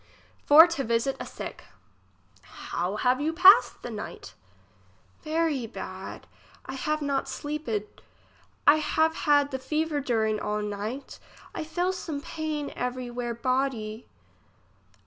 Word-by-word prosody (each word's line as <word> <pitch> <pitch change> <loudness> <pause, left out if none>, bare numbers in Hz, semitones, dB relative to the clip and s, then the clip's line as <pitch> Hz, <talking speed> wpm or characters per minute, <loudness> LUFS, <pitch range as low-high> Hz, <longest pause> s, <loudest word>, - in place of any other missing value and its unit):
For 305 +3 +10
to 335 -5 -2
visit 235 +3 0
a - - -6
sick. - - -8 0.8
How 180 +4 -4
have 250 +4 +1
you 315 +2 0
passed 385 +8 +6
the - - -5
night? - - -7 0.9
Very 310 -6 0
bad. 225 - -8 0.4
I - - -6
have 305 +3 -2
not 280 -1 -1
sleeped; 260 -7 -4 0.6
I 290 +2 +7
have 315 +1 +1
had 290 -3 +3
the 265 - -3
fever 305 +2 -1
during 220 -5 0
all 210 0 -2
night. 210 +6 -5 0.3
I - - -4
fell 350 +4 -1
some 320 -5 -5
pain 305 -1 -4
every 250 0 -3
where 240 -1 -3
body. 240 -3 -2
275 Hz, 125 wpm, -27 LUFS, 235-310 Hz, 0.9 s, For